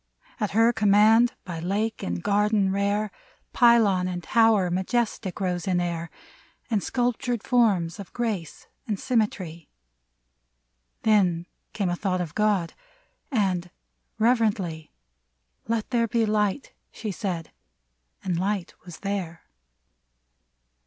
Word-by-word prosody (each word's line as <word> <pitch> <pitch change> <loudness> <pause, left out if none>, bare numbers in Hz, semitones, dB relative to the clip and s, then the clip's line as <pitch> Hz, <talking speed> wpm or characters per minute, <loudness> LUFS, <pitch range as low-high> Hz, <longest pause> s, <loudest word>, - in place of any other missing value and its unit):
At 210 -3 0
her 230 +1 +5
command, 220 +3 +5
by 170 -3 -5
lake 205 +6 -2
and 85 -1 -3
garden 205 -1 +2
rare, 200 +1 0 0.4
Pylon 220 -7 +4
and 175 -1 -4
tower 220 -4 +3
majestic 195 +1 -1
rose 180 -3 -2
in 180 -2 +2
air. 170 -1 -3 0.6
And 210 -3 +2
sculptured 245 -1 -1
forms 200 -8 +2
of 200 - -9
grace 215 -9 -3 0.2
and 210 -3 -2
symmetry. 190 - -1 1.3
Then 185 -6 +3 0.3
came 200 -4 -1
a - - 0
thought 185 0 -1
of 170 -4 -4
God, 210 -6 +1 0.6
and, 185 -7 0 0.5
reverently, 210 -9 +1 0.2
— - - -50
" - - -40
Let 225 0 -2
there 235 -2 +2
be 230 0 +1
Light! 210 +4 0
" - - -49
she 215 -2 -5
said; 180 -5 -4 0.7
and 175 -3 -1
Light 195 -1 -2
was 175 -2 -11
there. 185 -5 -4
200 Hz, 125 wpm, -25 LUFS, 175-225 Hz, 1.3 s, her